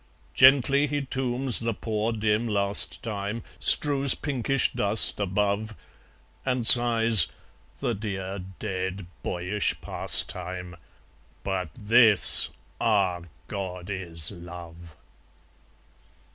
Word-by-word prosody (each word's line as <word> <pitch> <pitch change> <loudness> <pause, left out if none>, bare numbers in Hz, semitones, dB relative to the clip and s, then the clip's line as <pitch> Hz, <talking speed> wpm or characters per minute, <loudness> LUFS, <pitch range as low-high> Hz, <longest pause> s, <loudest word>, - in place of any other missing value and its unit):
Gently 135 +2 +3
he 145 -1 -4
tombs 130 -1 0
the 115 -1 -4
poor 110 +1 -4
dim 110 +1 -3
last 100 -1 +1
time, 105 +1 -6 0.2
Strews 140 -2 +2
pinkish 135 -2 -3
dust 105 +1 +2
above, 105 +2 -3 0.7
And 125 -3 -3
sighs, 115 -5 +7 0.5
"The 120 - -3
dear 100 -2 -7 0.2
dead 95 -2 -6 0.2
boyish 90 +6 -4
pastime! 90 -1 -2 0.7
But 95 -3 -5
THIS 110 -1 +5 0.3
ah, 100 -6 -1 0.3
God! 95 -2 -8
is 85 -5 -1
Love!" 85 -2 -13
105 Hz, 90 wpm, -23 LUFS, 95-120 Hz, 0.7 s, sighs